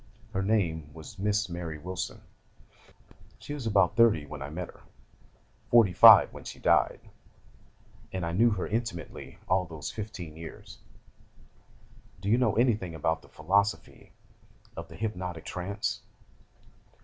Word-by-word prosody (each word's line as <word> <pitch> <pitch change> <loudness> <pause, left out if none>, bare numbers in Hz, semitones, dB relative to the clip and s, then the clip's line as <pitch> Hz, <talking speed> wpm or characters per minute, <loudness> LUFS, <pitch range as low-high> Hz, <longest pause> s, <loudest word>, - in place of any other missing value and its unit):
Her 95 - 0
name 85 -7 0
was 80 +4 -11
Miss 105 +1 +1
Mary 85 -3 -5
Wilson; 90 +4 -5 1.2
she 145 - -8
was 135 -6 -5
about 100 -2 +3
thirty 110 -10 +4
when 75 -1 -9
I 70 - -5
met 85 +3 -5
her, - - -16 0.9
forty 115 -6 +5
five - - +9
when - - -10
she - - -8
died, - - +2 1.1
and 95 -2 -3
I 85 - -2
knew 115 +7 +4
her 105 -5 -2
intimately 110 - -5
all 90 0 +2
those 80 -3 -7
fifteen 100 -7 -7
years. 80 0 -11 1.4
Do 100 +2 -3
you 115 +3 +4
know 120 -5 +2
anything 110 -8 +1
about 80 +1 -1
the - - -19
philosophy 100 +6 -1 0.6
of - - -7
the - - -13
hypnotic 90 -6 -4
trance? 100 +3 -3
95 Hz, 135 wpm, -28 LUFS, 80-110 Hz, 1.4 s, five